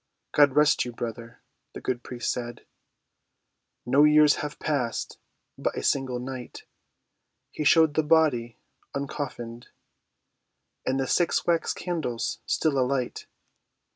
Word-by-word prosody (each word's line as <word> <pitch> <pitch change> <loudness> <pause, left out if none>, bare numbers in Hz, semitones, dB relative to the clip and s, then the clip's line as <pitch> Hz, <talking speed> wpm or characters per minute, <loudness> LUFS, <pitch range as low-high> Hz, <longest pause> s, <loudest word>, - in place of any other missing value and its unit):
"God 145 -2 +4
rest 150 0 +4
you, 125 - -6
brother," 115 0 -7 0.3
the - - -7
good 125 -1 -3
priest 125 -1 -3
said, 120 -1 -6 1.2
"No 135 +4 +4
years 150 0 +6
have 150 0 -5
passed—but 130 -6 -4
a - - -3
single 130 -3 0
night." 125 0 -7 0.9
He - - -4
showed 160 0 +5
the 155 - +2
body 150 -7 +2 0.4
uncoffinèd, 130 -4 -5 1.2
And 130 +1 +1
the 135 - 0
six 175 +6 +1
wax 170 -1 +1
candles 155 -10 -3
still 145 -4 +1
alight. 130 -1 -1
135 Hz, 115 wpm, -26 LUFS, 120-150 Hz, 1.2 s, years